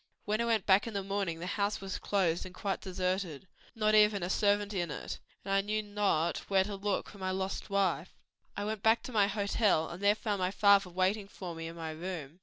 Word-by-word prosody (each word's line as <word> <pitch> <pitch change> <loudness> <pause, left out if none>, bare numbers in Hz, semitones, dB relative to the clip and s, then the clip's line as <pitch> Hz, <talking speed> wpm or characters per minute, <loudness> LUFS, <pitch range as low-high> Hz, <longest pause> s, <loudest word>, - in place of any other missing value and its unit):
When 215 +2 0
I - - +1
went 225 -5 +1
back 195 +3 +4
in 225 - -6
the 200 - -1
morning 195 -4 -2
the 170 - -6
house 200 +2 -1
was 195 0 -5
closed 180 -4 +1
and 180 -1 -10
quite 195 +1 -2
deserted; 185 -3 -2 0.3
not 215 -1 +2
even 210 -3 +5
a 180 - -1
servant 205 0 +2
in 175 -3 -1
it, 150 - -5 0.3
and 195 - -1
I 195 - +4
knew 215 +2 -1
not 205 -5 0
where 195 -1 +4
to 205 +1 -5
look 200 0 -1
for 200 - -13
my 185 0 -2
lost 190 +2 -3
wife. 190 -3 0 0.4
"I 205 - -2
went 215 -1 -3
back 225 +2 +3
to - - -7
my 210 -4 +4
hotel 200 -4 +1
and 175 +3 -8
there 205 +1 +4
found 210 -2 -2
my 180 0 +1
father 200 -1 +4
waiting 190 +3 0
for 185 -3 -7
me 165 0 -6
in 165 - -8
my 165 -1 -5
room. 165 -1 -6
195 Hz, 230 wpm, -31 LUFS, 180-205 Hz, 0.4 s, even